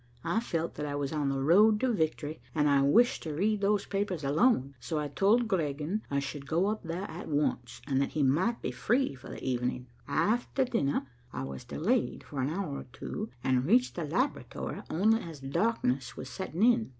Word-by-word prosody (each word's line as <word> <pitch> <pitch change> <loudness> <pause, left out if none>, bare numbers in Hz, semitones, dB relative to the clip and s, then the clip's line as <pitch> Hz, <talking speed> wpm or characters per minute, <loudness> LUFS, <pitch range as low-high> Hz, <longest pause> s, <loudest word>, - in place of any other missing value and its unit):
I 170 +6 +1
felt 170 -7 -2
that 150 - -4
I 145 - -3
was 145 +1 -2
on 145 -2 0
the 135 0 -1
road 210 +8 +6
to 255 -2 +2
victory, 155 - -1
and 150 -1 +3
I 140 -1 +4
wished 225 - +4
to 155 -3 -4
read 205 +5 +1
those 200 0 +2
papers 195 -5 -2
alone, 140 - +3
so 155 +6 -3
I 150 -1 -1
told 200 - +3
Griegen 160 +1 -1
I 140 - 0
should 140 0 -4
go 170 +5 +2
up 215 0 -2
there 170 +2 -4
at 175 -3 -7
once, 120 -5 -1
and 135 -2 +1
that 140 - -1
he 150 - +1
might 180 - +2
be - - -1
free 255 - +1
for 125 - -12
the - - -8
evening. 125 0 -1 0.2
After 220 - +1
dinner, 145 - 0 0.3
I 65 - -4
was 65 0 -7
delayed 230 +11 0
for 140 -3 -4
an 130 - 0
hour 160 -4 -3
or - - -9
two, 215 +1 -5
and 130 -1 +2
reached 245 +6 +4
the 170 - -3
laboratory 245 - -2
only 220 +7 +3
as 165 -4 -8
darkness 135 - 0
was - - -6
setting 190 0 -3
in. 235 -1 +4
160 Hz, 205 wpm, -30 LUFS, 140-210 Hz, 0.3 s, road